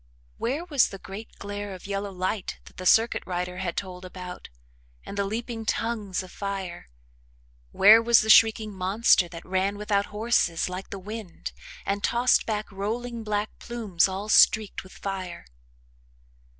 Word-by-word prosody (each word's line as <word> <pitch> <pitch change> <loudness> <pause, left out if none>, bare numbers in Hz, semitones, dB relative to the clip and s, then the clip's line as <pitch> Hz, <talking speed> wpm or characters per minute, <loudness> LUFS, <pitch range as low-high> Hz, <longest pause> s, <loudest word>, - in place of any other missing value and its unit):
Where 285 +8 -2
was 290 -8 +3
the 195 - -8
great 195 +3 -10
glare 205 -1 -5
of 185 - -12
yellow 200 0 -3
light 185 +2 -3
that - - -16
the 185 - -2
"circuit 225 +5 +4
rider" 180 0 -3
had 180 -2 -3
told 185 -2 -5
about 180 -1 -8 0.6
and - - -7
the 200 0 0
leaping 225 +2 -4
tongues 215 -4 -2
of 185 - -12
fire? 195 - -5 0.8
Where 215 +3 +8
was 235 0 +5
the 220 - -3
shrieking 220 -1 +5
monster 190 0 +3
that 170 0 -10
ran 190 +2 0
without 205 -1 0
horses 210 -6 +1
like 185 +1 -6
the 200 - -6
wind 205 -1 -7 0.3
and 200 +1 -1
tossed 245 +2 +3
back 215 -2 -2
rolling 230 +4 -4
black 210 0 -1
plumes 215 -8 0
all 195 +2 -5
streaked 215 0 +4
with 190 - -15
fire? 190 -3 -5
200 Hz, 155 wpm, -26 LUFS, 185-220 Hz, 0.8 s, Where